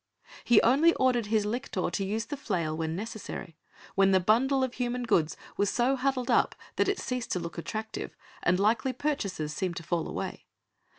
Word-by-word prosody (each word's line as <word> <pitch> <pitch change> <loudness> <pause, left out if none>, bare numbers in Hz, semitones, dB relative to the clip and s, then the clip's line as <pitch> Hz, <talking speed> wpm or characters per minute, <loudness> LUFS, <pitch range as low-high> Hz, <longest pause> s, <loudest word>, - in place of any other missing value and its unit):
He 240 -3 +6
only 290 +8 +5
ordered 245 -4 +2
his 215 -1 +2
lictor 210 -5 -2
to 195 - -1
use 215 +4 -2
the 290 - -4
flail 165 - -2
when 160 0 -2
necessary, 210 -5 -6 0.4
when 195 0 +4
the 190 -1 +5
bundle 260 +8 +3
of 260 -1 -1
human 245 0 -2
goods 165 -9 +1 0.2
was 205 - +2
so 250 +3 +2
huddled 260 -1 0
up - - +3 0.2
that - - +3
it 400 - +1
ceased 250 -2 -3
to 180 - 0
look 170 0 -6
attractive, 220 +5 -5 0.3
and 180 +1 +2
likely 220 +5 +2
purchasers 200 - -2
seemed 180 +2 -2
to - - -5
fall 170 0 -1
away. - - -5
220 Hz, 185 wpm, -29 LUFS, 180-250 Hz, 0.4 s, He